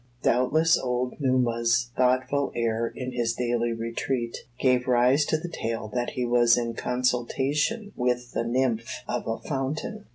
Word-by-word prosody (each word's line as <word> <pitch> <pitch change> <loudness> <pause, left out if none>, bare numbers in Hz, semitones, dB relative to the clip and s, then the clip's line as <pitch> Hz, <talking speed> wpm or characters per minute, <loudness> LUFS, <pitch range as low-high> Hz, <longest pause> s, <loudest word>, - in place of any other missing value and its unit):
Doubtless 155 +7 +3
old 125 0 -1
Numa's 120 -3 +1
thoughtful 130 +2 +1
air 115 0 0
in 130 +2 -6
his 120 -2 0
daily 120 -1 0
retreat, 115 +1 -2 0.2
gave 125 -1 +2
rise 125 +4 +4
to 155 - +1
the 165 +3 -6
tale 115 -8 -4
that 120 -1 -1
he 125 - 0
was 120 -1 +4
in 120 -1 -1
consultation 135 - 0
with 125 -1 -1
the - - -1
nymph 120 -1 0 0.2
of - - -3
a 115 0 -1
fountain. 155 - -4
125 Hz, 150 wpm, -26 LUFS, 120-130 Hz, 0.2 s, rise